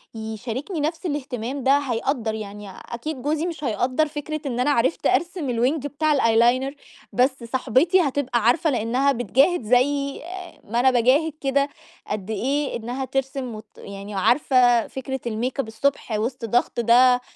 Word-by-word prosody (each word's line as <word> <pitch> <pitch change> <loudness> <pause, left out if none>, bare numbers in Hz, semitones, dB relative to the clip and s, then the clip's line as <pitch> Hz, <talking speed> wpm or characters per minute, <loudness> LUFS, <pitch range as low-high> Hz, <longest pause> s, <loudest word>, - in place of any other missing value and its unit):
يشاركني 230 - -5
نَفْس 320 +5 -2
الاهتمام 270 -4 -3
ده 275 +2 +5
هيقدَّر، 245 -3 -1
يعني 210 -1 -7
أكيد 255 +8 -7
جوزي 300 +4 -1
مش 330 -4 -5
هيقدَّر 255 +5 +1
فكرة 305 +1 -5
إن 245 -3 -2
أنا 270 +4 +2
عرفت 260 +3 +1
أرسم 345 -3 0
الwing 245 +6 +1
بتاع 300 +1 +1
الeyeliner، 240 +3 +3 0.4
بس 260 0 +1
صاحبتي 260 +9 +2
هتبقى 275 -5 0
عارفة 315 +8 +3
لأنها 255 +2 +1
بتجاهد 265 - +2
زي 275 +5 +1 0.4
ما 230 +3 -2
أنا 260 +1 +5
باجاهد 260 +6 +3
كده 280 +1 +1 0.4
قَدّ 205 -1 -4
إيه 270 +7 -1
إنها 245 +4 -4
ترسم 265 -2 -3
وت 215 0 -13
يعني 200 +1 -8
وعارفة 245 +2 +3
فكرة 265 0 -5
الmakeup 245 +4 -2
الصبح 230 +2 -1
وسط 230 +3 -2
ضغط 240 +2 0
ده 245 +2 +5
255 Hz, 145 wpm, -23 LUFS, 235-285 Hz, 0.4 s, ده